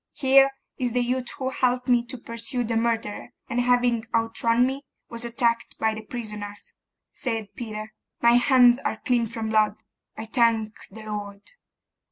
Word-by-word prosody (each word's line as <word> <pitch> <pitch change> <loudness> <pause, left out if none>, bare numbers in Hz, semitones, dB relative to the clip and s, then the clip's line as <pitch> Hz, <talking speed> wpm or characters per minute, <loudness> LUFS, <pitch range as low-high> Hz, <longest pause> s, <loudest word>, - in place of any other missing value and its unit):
'Here 270 0 +5 0.3
is 245 -3 -1
the 245 0 +2
youth 250 0 -1
who 260 -1 -2
helped 250 0 0
me 245 -2 +4
to 260 +1 -6
pursue 230 +2 -4
the 230 0 -2
murderer, 225 -2 -1
and 245 - 0
having 245 -2 +2
outrun 230 +1 +2
me, 265 +2 -2 0.3
was 235 0 -4
attacked 235 -1 0
by 220 0 +1
the 220 - -6
prisoners,' 210 -3 -7 0.4
said 225 -5 -4
Peter. 215 -2 -6 0.3
'My 235 - +5
hands 245 0 +5
are 220 - -2
clean 240 -2 +2
from 225 0 -4
blood, 215 -1 +1 0.3
I 220 - -5
thank 225 -2 +2 0.2
the 220 +2 -11
Lord! 205 -1 -6
235 Hz, 160 wpm, -25 LUFS, 220-245 Hz, 0.4 s, Here